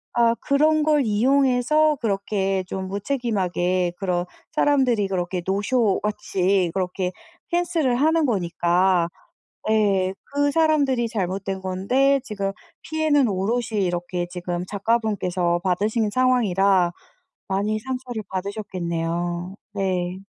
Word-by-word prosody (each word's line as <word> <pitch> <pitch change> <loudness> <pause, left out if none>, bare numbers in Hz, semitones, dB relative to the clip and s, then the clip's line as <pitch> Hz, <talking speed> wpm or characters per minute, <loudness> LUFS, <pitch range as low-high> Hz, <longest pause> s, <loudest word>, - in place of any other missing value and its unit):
아 235 -1 +4
그런 305 +2 +3
걸 300 -2 +3
이용해서 270 +6 +3
그렇게 195 -2 0
좀 190 0 -4
무책임하게 190 -5 -1
그런 180 -2 -1 0.3
사람들이 260 -9 +2
그렇게 180 -1 -2
노쇼 205 +2 +1
같이 190 -3 0
그렇게 180 0 -1 0.4
펜스를 335 -7 +1
하는 315 +3 +3
거니까. 175 -2 +2 0.6
예. 195 -3 +2 0.2
그 285 0 +2
사람들이 285 -6 +2
잘못된 195 -2 -3
건데 250 +10 +2
지금 200 -4 -3 0.3
피해는 310 -4 +2
오롯이 215 +2 -1
이렇게 175 0 -2
지금 175 0 -4
작가분께서 195 -5 0
받으신 210 +4 +1
상황이라 200 -8 +3 0.6
많이 205 +3 0
상처를 250 -2 -5
받으셨겠네요. 175 -2 -3 0.2
네. 185 -2 -1
200 Hz, 265 characters per minute, -23 LUFS, 185-250 Hz, 0.6 s, 아